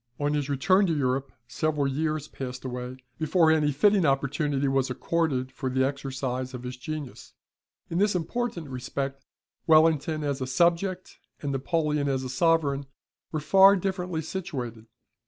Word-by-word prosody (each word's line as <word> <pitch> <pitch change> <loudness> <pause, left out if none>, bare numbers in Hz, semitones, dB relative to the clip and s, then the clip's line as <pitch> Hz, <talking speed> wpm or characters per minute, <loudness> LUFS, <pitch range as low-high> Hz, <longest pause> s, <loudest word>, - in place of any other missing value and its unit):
On 145 0 0
his 145 -1 -1
return 185 +8 +3
to 165 -3 0
Europe 135 0 0 0.2
several 145 +3 0
years 155 +2 -1
passed 130 -2 -7
away 125 0 -5 0.2
before 160 +1 +3
any 150 -2 +3
fitting 200 +7 +3
opportunity 140 0 +1
was 135 -1 +1
accorded 130 -1 -1
for 130 0 -4
the 130 +1 +2
exercise 130 -2 -3
of 125 - -8
his 125 0 -5
genius. 145 +1 -7 0.5
In 170 - -2
this 205 -1 +2
important 180 -1 -2
respect, 135 +1 -4 0.4
Wellington, 155 -1 +4
as 140 -2 -2
a 130 - -2
subject, 175 +6 0 0.2
and 145 - -1
Napoleon, 150 +1 0
as 130 -1 -1
a 130 - -4
sovereign, 140 -1 +1 0.4
were 155 - -1
far 195 +5 +6
differently 180 -3 -2
situated. 125 -11 -5
145 Hz, 150 wpm, -27 LUFS, 130-165 Hz, 0.5 s, far